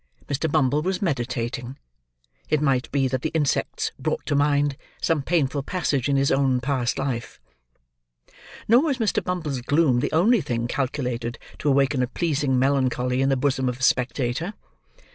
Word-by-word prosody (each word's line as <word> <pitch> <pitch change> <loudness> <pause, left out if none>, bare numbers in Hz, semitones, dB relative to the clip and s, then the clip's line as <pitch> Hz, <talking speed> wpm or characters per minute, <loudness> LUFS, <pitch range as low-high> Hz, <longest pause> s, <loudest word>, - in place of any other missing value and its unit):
Mr. 145 +2 -1
Bumble 145 -1 +2
was 185 +3 -1
meditating; 125 - -3 0.7
it 155 - +2
might 135 -4 0
be 135 -1 +2
that 130 0 -2
the 160 - -1
insects 150 -3 0
brought - - -2
to - - -1
mind, 145 0 +2 0.2
some 165 -3 +1
painful 145 -2 0
passage 145 -4 -1
in 140 - +2
his 135 0 +2
own 135 -2 +2
past 125 -2 -1
life. 130 -4 -3 1.3
Nor 235 +4 +6
was 290 -4 0
Mr. 225 -5 0
Bumble's 155 -8 -3
gloom 140 -1 +2
the - - -1
only 205 +7 +4
thing 120 -5 -2
calculated 125 -3 -2 0.2
to 145 - 0
awaken 135 -1 +2
a 125 - +1
pleasing 145 -2 0
melancholy 130 -1 +1
in 135 - +2
the 135 - +2
bosom 130 -1 +1
of 125 - -4
a - - -5
spectator. 130 - 0
135 Hz, 160 wpm, -24 LUFS, 125-150 Hz, 1.3 s, Nor